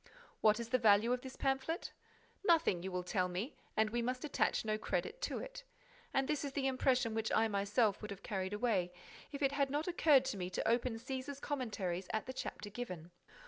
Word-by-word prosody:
What 215 +1 +5
is 235 -1 -4
the 255 +1 +3
value 220 +1 +5
of 250 - -1
this 260 0 -8
pamphlet? 270 +6 -1 0.5
Nothing, 330 - +4
you 190 +1 -4
will 180 0 -2
tell 180 0 +1
me, 185 +10 -3 0.2
and 215 0 +3
we 240 +1 0
must 250 +3 -2
attach 290 - +1
no 215 0 +1
credit - - -2
to - - -1
it. - - -7 0.5
And 270 0 +1
this 300 -1 0
is 280 -1 -4
the 275 -1 -1
impression 255 -3 +2
which 220 0 -1
I 225 - +4
myself 205 +1 +1
would 210 - -6
have 200 -1 -7
carried 190 -1 -2
away, 210 -5 +1 0.4
if 285 0 -4
it 275 - +4
had 280 -1 +1
not 295 +4 -1
occurred 305 -6 +5
to 260 -6 -2
me 180 -1 -3
to 185 - -2
open 235 +1 +2
Cæsar's 265 +4 -5
Commentaries 205 -11 -2
at 220 - -1
the 260 - -5
chapter 205 -4 -5
given. 180 -7 -6
235 Hz, 210 wpm, -36 LUFS, 205-270 Hz, 0.5 s, What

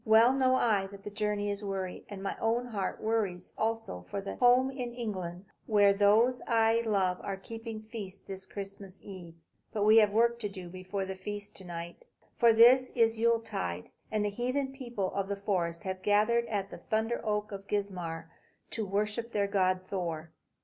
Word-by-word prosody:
Well 225 +3 +6
know 260 -1 +3
I 210 -6 +2
that 200 0 -12
the 205 - -6
journey 205 0 -1
is 200 +1 -4
weary; 190 -2 -4
and 200 -2 -7
my 195 - -2
own 230 +2 +1
heart 215 -5 -3
wearies 210 -5 -1
also 225 - -2
for 200 - -3
the 195 0 -5
home 250 +2 +5
in 245 -3 -5
England, 185 -6 -4 0.2
where 205 -2 +5
those 215 +5 +4
I 225 0 +3
love 190 -4 +1
are 195 -1 -4
keeping 225 +2 -7
feast 215 -3 -8
this 190 -1 -7
Christmas 195 -1 -7
eve. 180 -4 -10 0.4
But 210 - -1
we 215 +2 +7
have 215 -2 +7
work 235 +3 +2
to 210 -3 -2
do 185 -3 -8
before 185 +2 -4
we 190 - -4
feast 205 +2 -6
to 190 - -8
night. 170 - -7 0.4
For 235 -2 +7
this 245 +3 +7
is 225 -2 +4
the 225 - -7
Yuletide, 225 - 0 0.2
and 215 -1 +1
the - - +1
heathen 255 +5 -1
people 240 -8 -3
of 195 -1 -1
the 200 - -2
forest 180 -4 -1
have 185 -1 -4
gathered 215 +4 +3
at 200 -2 -2
the - - -8
thunder 220 +2 -1
oak 210 -1 -1
of 200 0 -7
Geismar 180 -6 -3 0.4
to 225 - -1
worship 210 +4 -1
their 200 -1 +1
god, 185 -2 +2
Thor. 170 -4 -4
205 Hz, 190 wpm, -31 LUFS, 190-225 Hz, 0.4 s, we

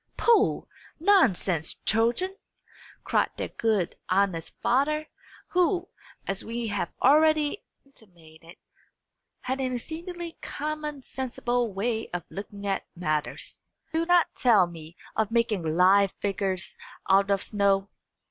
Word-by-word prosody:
"Pooh, 440 -3 +3 0.3
nonsense, 205 - +3
children!" 235 - +2 0.7
cried - - +1
their - - -3
good, 215 -6 0
honest 185 -3 +1
father, 305 +5 +1 0.4
who, 360 0 +1 0.4
as 195 0 -3
we 230 0 -3
have 175 - -2
already 310 +3 +4 0.2
intimated, 170 -9 -17 0.8
had 260 +1 -2
an 255 -1 -1
exceedingly 335 +5 -6
common 300 -2 -4
sensible 245 -3 -2
way 220 +3 -2
of 175 - -3
looking 200 0 -7
at 195 -1 -1
matters. 155 -4 -3 0.3
"Do 330 +1 0
not 350 -1 +5
tell 225 -8 +5
me 165 -1 -11 0.2
of 220 -2 +1
making 230 -4 +1
live 185 +5 +4
figures 195 -2 -2 0.3
out 195 +1 +4
of 200 -1 +1
snow. 200 -1 +1
225 Hz, 115 wpm, -27 LUFS, 190-300 Hz, 0.8 s, not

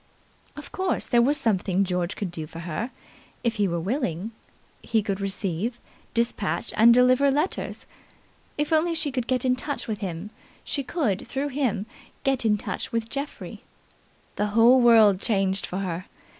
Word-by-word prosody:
Of 295 0 -10
course 375 -1 0
there 240 - +3
was 285 +5 +2
something 195 -6 +1
George 180 -1 -2
could 195 -4 -4
do 160 -3 -6
for 165 +2 -9
her 170 +8 -3 0.5
if 230 -2 0
he 205 -1 +2
were 170 -1 -1
willing. 205 - -2 0.5
He 220 -2 0
could 195 -1 -2
receive, 195 +4 -2 0.4
despatch 235 -4 -1
and 230 +2 +7
deliver 255 +3 +5
letters. 300 +7 -2 0.7
If 295 +2 0
only 330 +2 +2
she 305 -2 -1
could 250 -2 -2
get 255 -1 0
in 255 0 +3
touch 285 +3 -4
with 215 -3 -3
him, 185 +1 -5 0.3
she 280 - -2
could 250 - -1
through 275 +2 -2
him 250 -7 -1 0.4
get 270 -3 0
in 210 -1 +3
touch 195 -2 -4
with 230 0 -2
Geoffrey. 280 +1 -6 0.8
The 210 - +1
whole 245 +3 +7
world 220 -5 +6
changed 195 -3 +1
for 180 - -4
her. 185 -2 -3
225 Hz, 165 wpm, -25 LUFS, 195-260 Hz, 0.8 s, and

